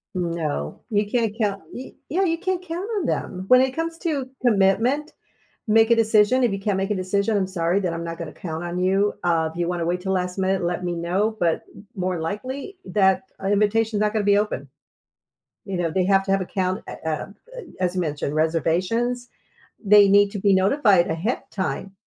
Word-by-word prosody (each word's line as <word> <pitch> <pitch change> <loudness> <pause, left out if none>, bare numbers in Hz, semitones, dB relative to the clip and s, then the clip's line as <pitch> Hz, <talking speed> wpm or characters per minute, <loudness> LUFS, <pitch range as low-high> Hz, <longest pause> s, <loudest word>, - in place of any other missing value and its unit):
No. 165 - -3
You 205 -1 0
can't 230 -3 0
count 200 -3 -1
Y 255 - -8 0.2
yeah, 370 +6 +1
you 330 -2 +1
can't 370 -1 -1
count 350 +5 -4
on 350 - -3
them. 185 -6 -3
When 255 +3 +7
it 260 0 +1
comes 330 +3 -3
to 285 -7 -2
commitment, 240 +7 +2 0.6
make 225 +1 +4
a 235 - +7
decision 220 +2 +3
if 235 - +3
you 195 - -3
can't 200 -1 -1
make 195 +2 -1
a 210 - +1
decision, 200 +3 0
I'm 190 - 0
sorry, 180 0 0
then 180 -4 -2
I'm 170 0 -4
not 165 0 -5
gonna 165 -3 -7
count 160 -1 -6
on 175 0 -4
you. 195 +3 +2
Uh, 165 -2 +1
if 165 - -12
you 175 -1 0
wanna 175 -2 -2
wait 180 +1 -1
till 190 0 -1
last 180 0 -2
minute, 190 0 0
let 175 +1 -2
me 175 -1 -1
know, 190 +6 0
but 170 -2 +1
m 205 - -14
more 185 -2 -2
likely 260 - -5
that 190 +2 +2 0.2
invitation's 210 +1 +1
not 210 0 +1
gonna 215 -2 0
be 205 0 +4
open. 175 -10 -2 1.0
You 195 -2 -4
know, 170 -2 0
they 185 +2 +1
have 195 0 +3
to 195 - -4
have 195 - +2
a - - -6
count, 185 0 -2
ah, - - -5
uh, - - +1 0.5
uh, - - -4 0.2
as 180 -1 0
you 185 - 0
mentioned, 150 -3 -2
reservations. 185 +10 0 0.6
They 205 0 +7
need 200 0 +5
to 205 - -4
be 200 0 +3
notified 195 -1 +4
ahead 175 +10 -1
of - - -35
time. 195 0 -3
195 Hz, 210 wpm, -23 LUFS, 180-225 Hz, 1.0 s, When